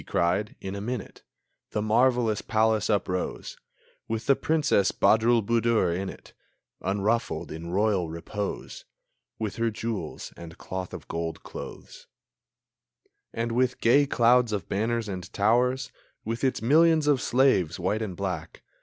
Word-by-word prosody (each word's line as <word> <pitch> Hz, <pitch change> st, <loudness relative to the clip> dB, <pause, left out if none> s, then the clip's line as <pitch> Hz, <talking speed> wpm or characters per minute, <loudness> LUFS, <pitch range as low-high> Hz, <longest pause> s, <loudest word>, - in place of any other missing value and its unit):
he -, -, -18 dB
cried. 90 Hz, +5 st, 0 dB
In 95 Hz, -, -5 dB
a 100 Hz, -, -5 dB
minute 120 Hz, -1 st, -5 dB, 0.5 s
The 105 Hz, -, 0 dB
marvellous 115 Hz, -1 st, +2 dB
palace 110 Hz, 0 st, +1 dB
uprose, 90 Hz, -3 st, -2 dB, 0.5 s
With 115 Hz, 0 st, -3 dB
the 140 Hz, -, +5 dB
Princess 150 Hz, -12 st, +2 dB
Badroulboudour 115 Hz, -3 st, +3 dB
in 95 Hz, +1 st, -3 dB
it -, -, -12 dB, 0.5 s
Unruffled 105 Hz, +4 st, -1 dB
in 80 Hz, +2 st, -6 dB
royal 95 Hz, -2 st, +1 dB
repose, 100 Hz, +5 st, -5 dB, 0.5 s
With 110 Hz, -3 st, -4 dB
her 115 Hz, 0 st, +1 dB
jewels 110 Hz, -1 st, -5 dB
and 85 Hz, -1 st, -11 dB
cloth 95 Hz, -1 st, -6 dB
of -, -, -10 dB
gold 85 Hz, -1 st, -4 dB
clothes; -, -, -10 dB, 1.2 s
And 115 Hz, +1 st, -2 dB
with 125 Hz, +1 st, +1 dB
gay 140 Hz, +5 st, +4 dB
clouds 120 Hz, -1 st, +4 dB
of 100 Hz, -5 st, -3 dB
banners 115 Hz, +2 st, -1 dB
and 90 Hz, -3 st, -6 dB
towers, 125 Hz, +5 st, +2 dB, 0.3 s
With 115 Hz, +3 st, -3 dB
its 130 Hz, -4 st, 0 dB
millions 160 Hz, +4 st, +5 dB
of 145 Hz, -3 st, +3 dB
slaves, 120 Hz, -, +2 dB
white 100 Hz, +5 st, 0 dB
and 95 Hz, -5 st, -4 dB
black. -, -, -4 dB
110 Hz, 135 wpm, -27 LUFS, 95-120 Hz, 1.2 s, the